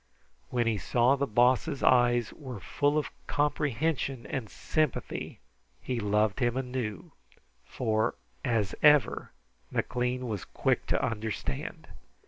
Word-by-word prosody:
When 120 -2 +1
he 110 -3 +1
saw 120 +8 +3
the 140 0 -1
Boss's 125 +4 +2
eyes 120 -2 +4
were 130 -7 -8
full 145 +8 +1
of 150 - -1 0.2
comprehension 145 -3 0
and 115 -3 -4
sympathy, 155 -4 -2 0.4
he 120 - -3
loved 105 0 +1
him 120 -1 +1
anew, 125 -6 -4 0.5
for, 110 -3 0 0.3
as 110 -5 0
ever, 150 -2 +4 0.4
McLean 125 0 -1
was 105 -5 -3
quick - - 0
to - - +1
understand. 110 - -4
125 Hz, 115 wpm, -29 LUFS, 110-135 Hz, 0.5 s, eyes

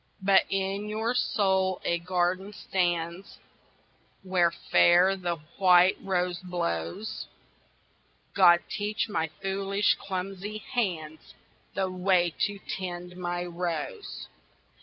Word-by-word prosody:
But 195 0 +5
in 195 +2 -2
your 220 +3 -1
soul 190 -6 +1
a 170 - +1
garden 180 +3 -1
stands 175 -2 -2 0.9
Where 185 -2 +3
fair 175 +2 +4
the 175 -2 -2 0.2
white 180 -1 +6
rose 180 -2 -1
blows 175 - -3 1.1
God, 175 -3 +6
teach 210 +1 -2
my 165 -7 -1 0.2
foolish 195 +1 +1
clumsy 195 +2 -5
hands 175 -10 -4 0.4
The 190 -1 -1
way 180 -2 +2
to 205 0 -7 0.2
tend 180 -1 -6
my 175 -1 -3
rose. 180 - -4
185 Hz, 100 wpm, -28 LUFS, 175-195 Hz, 1.1 s, white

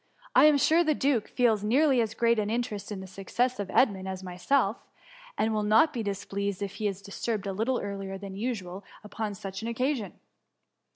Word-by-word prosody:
I - - +7
am 305 -1 +6
sure 325 +4 +4
the 310 -2 +2
duke 265 -7 +1
feels 225 -4 +2
nearly 260 +3 +3
as 220 -1 -2
great 235 -1 +3
an 210 -1 -1
interest 225 -3 -3
in 195 -2 -5
the - - -7
success 205 +7 -2
of 200 -2 -3
Edmund 195 -7 +2
as 190 0 -5
myself, 195 +5 +1 0.6
and 220 0 +1
will 215 - +1
not 220 +9 +4
be 240 - -2
dis 200 -2 -3
pleased 200 0 -3
if 200 -1 -6
he 215 - 0
be 200 - 0
disturbed 200 +2 -4
a 195 - -2
little 230 +6 0
earlier 195 -1 -5
than 195 -1 -8
usual 200 -4 -4 0.2
upon 210 0 -4
such 195 0 -6
an 225 - -4
occasion. 250 -1 -1
210 Hz, 205 wpm, -28 LUFS, 195-245 Hz, 0.6 s, I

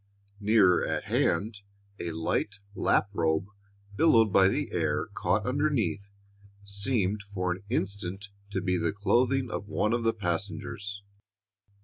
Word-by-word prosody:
Nearer 100 -4 +4
at - - -1
hand, 105 0 0 0.4
a 85 - -3
light 80 +5 -1 0.2
lap 100 - +2
robe, 80 -1 +1 0.5
billowed 115 -8 +4
by 95 -1 +6
the 95 - -1
air - - 0
caught 100 +1 0
underneath, 125 - 0 0.6
seemed 100 0 -1
for 95 -3 -3
an 90 +2 -4
instant 100 -3 -3 0.2
to 100 -2 -2
be 90 0 +1
the 85 +1 0
clothing 125 +5 +1
of 100 - -4
one 105 +2 0
of 120 - +1
the 115 0 +2
passengers. 100 +2 -4
100 Hz, 130 wpm, -28 LUFS, 95-110 Hz, 0.6 s, by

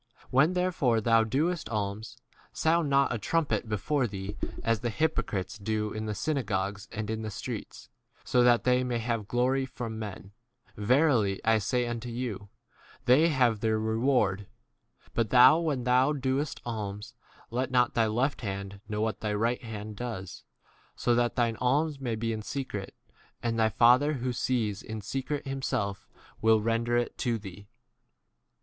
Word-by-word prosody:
When 140 +7 +4
therefore 175 -11 +1
thou 115 0 +4
doest 155 +9 -1
alms, 105 0 -3 0.3
sound 160 -1 +1
not 140 -2 +3
a 115 - -2
trumpet 150 -1 0
before 125 +5 0
thee, 100 0 -6 0.3
as 115 -2 +1
the 120 - -2
hypocrites 110 -7 -1
do 105 +1 -2
in 110 0 -4
the 105 - -2
synagogues 100 -6 -2
and 110 -1 -4
in 110 0 -3
the 110 - -4
streets, 100 - -7 0.4
so 125 - +2
that 120 -1 +5
they 125 0 +3
may 125 -1 -1
have 115 -2 -2
glory 130 +3 +1
from 115 -3 -6
men. 100 -2 -7 0.4
Verily 115 -3 +2
I 115 0 +4
say 125 +4 0
unto 120 0 -4
you, 115 -5 -4 0.6
They 130 +7 +6
3 165 - 0
have 120 -3 +4
c - - -17
their 110 0 +1
reward. 110 -3 +1 0.7
But 115 -3 0
thou, 130 +6 +7
when 150 -7 -1
thou 125 +4 +3
doest 135 +1 -2
alms, 105 -1 -5 0.4
let 125 +2 -1
not 125 -1 +2
thy 115 -1 +2
left 125 +6 0
hand 100 -2 -5
know 105 0 -2
what 110 0 -1
thy 105 -1 -2
right 115 +4 0
4 115 - -9
hand 105 -1 -6
does; 115 -7 -6 0.5
so 120 - +1
that 120 0 +1
thine 115 -2 +1
alms 145 +4 +1
may 120 -4 -2
be 115 +1 -2
in 110 - -4
secret, 110 -5 -5 0.5
and 115 -1 0
thy 110 0 +4
Father 125 +7 +5
who 125 -2 -2
sees 110 -5 -1
in 110 -1 -6
secret 135 +7 -3
himself 130 -7 -2 0.3
will 110 0 +5
render 115 +2 +1
[it] 120 - -2
to 120 -3 0
thee. 100 -1 -10
115 Hz, 170 wpm, -29 LUFS, 105-130 Hz, 0.7 s, thou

